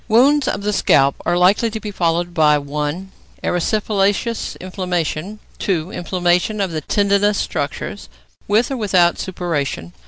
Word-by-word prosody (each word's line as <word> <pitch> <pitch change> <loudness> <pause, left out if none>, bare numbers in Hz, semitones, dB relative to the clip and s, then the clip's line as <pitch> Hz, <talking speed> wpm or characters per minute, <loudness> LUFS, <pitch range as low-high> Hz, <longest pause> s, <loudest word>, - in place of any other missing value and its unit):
= - - -33
Wounds 265 +5 +4
of 200 - -2
the 210 0 0
scalp 140 -7 +4
are 175 - +2
likely 195 +6 +3
to 220 0 -5
be 210 -1 -6
followed 175 -1 0
by 150 -2 +4
(1) 150 +6 -4 0.3
erysipelatous 205 +4 0
inflammation; 180 0 -3 0.2
(2) 180 -2 -1
inflammation 180 +3 0
of 195 -3 -1
the 155 -1 -3
tendinous 200 +4 +2
structures, - - -4 0.4
with 225 +6 +2
or 270 - -2
without 185 -6 +2
suppuration. 145 - -3
185 Hz, 145 wpm, -19 LUFS, 170-210 Hz, 0.4 s, Wounds